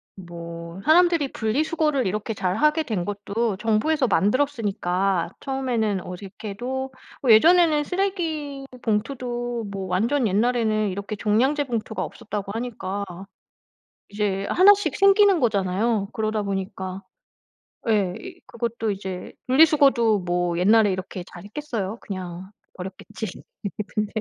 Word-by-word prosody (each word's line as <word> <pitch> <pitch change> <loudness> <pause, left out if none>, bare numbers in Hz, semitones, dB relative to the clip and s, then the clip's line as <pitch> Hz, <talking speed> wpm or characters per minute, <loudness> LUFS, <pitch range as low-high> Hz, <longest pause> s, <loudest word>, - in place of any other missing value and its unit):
뭐 170 0 -8
사람들이 330 -3 +4
분리수거를 290 +4 0
이렇게 210 +3 -2
잘하게 300 - +1
된 205 -10 -2
것도 205 +1 -2
정부에서 235 +6 +1
만들었으니까 195 -7 +1
처음에는 240 -8 -1
어색해도 215 +8 -5 0.3
뭐 250 -4 +4
예전에는 315 +4 +6
쓰레기 325 -8 -2 0.2
봉투도 240 +1 -2
뭐 195 -1 -4
완전 230 +8 +1
옛날에는 215 0 +1
이렇게 200 +3 -4
종량제 250 +8 +2
봉투가 225 -3 -3
없었다고 205 -4 -5
하니까 205 -4 -4 1.0
이제 200 -1 -1
하나씩 405 +2 +5
생기는 395 -2 +5
거잖아요. 200 0 +1
그러다 215 -1 -1
보니까 195 -1 -4 0.9
예, 195 -4 +2
이 360 -1 -10
그것도 230 -2 -2
이제 190 -2 -6 0.2
분리수거도 270 -7 +5
뭐 175 -1 -1
옛날에 210 +2 +5
이렇게 185 -1 -5
잘 175 - -10
했겠어요? 220 -3 -4
그냥 185 -1 -6 0.2
버렸겠지. 190 +4 -7 0.7
근데 210 -1 -1
220 Hz, 300 characters per minute, -24 LUFS, 195-270 Hz, 1.0 s, 예전에는